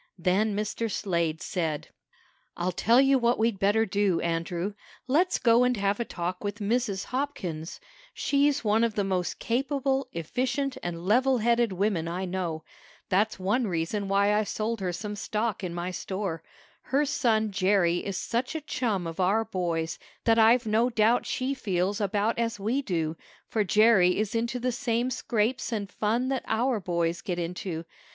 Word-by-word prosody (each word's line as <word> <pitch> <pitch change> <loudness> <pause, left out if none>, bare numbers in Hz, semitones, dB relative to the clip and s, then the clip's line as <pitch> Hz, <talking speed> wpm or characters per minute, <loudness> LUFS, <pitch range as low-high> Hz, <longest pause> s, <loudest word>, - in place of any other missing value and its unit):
Then 200 +3 +1
Mr. 215 +2 -2
Slade 170 -6 -1
said: 160 -5 -2 0.7
"I'll 175 +1 0
tell 230 +7 +4
you 270 0 +5
what 240 0 +2
we'd 220 -3 +1
better 210 +3 +3
do, 195 -3 +1
Andrew. 170 +3 -2 0.3
Let's 315 +8 +2
go 235 +1 +4
and 250 -1 +2
have 200 +1 0
a 235 - -1
talk 180 0 -4
with 205 0 -3
Mrs. 210 -1 0
Hopkins. 190 - -4 0.3
She's 285 -1 +1
one 220 +1 +3
of 230 -2 0
the 205 - +1
most 185 -2 -1
capable, 270 +2 0
efficient 255 - -2
and 175 0 -5
level 255 +6 +3
headed 235 0 +2
women 185 -3 0
I 180 +3 -3
know. 175 -4 -3 0.5
That's 205 +4 +2
one 210 +6 0
reason 180 +3 -2
why 200 +1 +3
I 210 +1 +2
sold 215 +1 -3
her 185 -2 -1
some 210 +4 -5
stock 210 0 -2
in 180 - -3
my 175 +1 -3
store. 190 -3 -4 0.4
Her 280 +3 +1
son 220 -6 +1
Jerry 185 -2 +2
is 195 -2 -4
such 240 +6 -2
a 320 - -2
chum 225 - -1
of 165 +1 -6
our 200 +5 +2
boys 170 -6 -2 0.2
that 225 0 +4
I've 230 +2 +5
no 225 +3 +2
doubt 230 +1 +2
she 260 +2 -1
feels 195 -3 -1
about 205 +3 0
as 230 -2 -1
we 230 +8 0
do, 165 - -2 0.3
for 215 - 0
Jerry 205 -3 +4
is 215 +1 -1
into 235 +2 -1
the 250 +1 0
same 240 0 -1
scrapes 235 -1 -1
and 210 -3 -2
fun 230 +6 0
that 265 -2 -1
our 235 +1 +1
boys 170 -2 -1
get 180 -2 -3
into. 170 -1 -4
210 Hz, 170 wpm, -27 LUFS, 180-235 Hz, 0.7 s, you